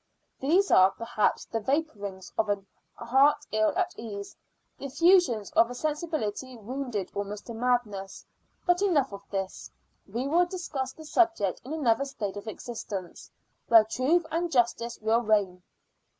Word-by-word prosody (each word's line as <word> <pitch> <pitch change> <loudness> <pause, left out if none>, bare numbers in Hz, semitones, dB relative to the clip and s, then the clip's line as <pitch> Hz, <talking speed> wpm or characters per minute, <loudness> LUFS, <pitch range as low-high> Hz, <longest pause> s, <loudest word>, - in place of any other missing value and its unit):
These 355 +9 +2
are, 185 +1 +7
perhaps, 215 +1 -1
the 225 - -3
vapourings 210 - -3
of 215 -1 0
a 205 - +2 0.4
heart 265 +5 +3
ill 215 0 +2
at 370 -1 0
ease 200 -3 -7 0.4
the - - -7
effusions 285 - +3
of 230 - +4
a 245 - -6
sensibility 290 -5 -3
wounded 235 -3 -4
almost 200 +1 -5
to 235 - -7
madness. 225 -5 -1 0.4
But 355 +1 +3
enough 300 - +2
of 200 0 -10
this; 195 -1 -4 0.4
we 235 +6 -3
will 345 +4 +3
discuss 305 -8 -4
the 315 - -13
subject 305 - +1
in 260 - -9
another 275 -4 +1
state 215 -8 -5
of 205 +2 -8
existence, 210 -5 -6 0.4
where 225 -2 +8
truth 265 +10 +1
and 340 +1 -1
justice 235 -2 +1
will 220 +2 +2
reign. 205 -5 +1
235 Hz, 150 wpm, -28 LUFS, 205-295 Hz, 0.4 s, where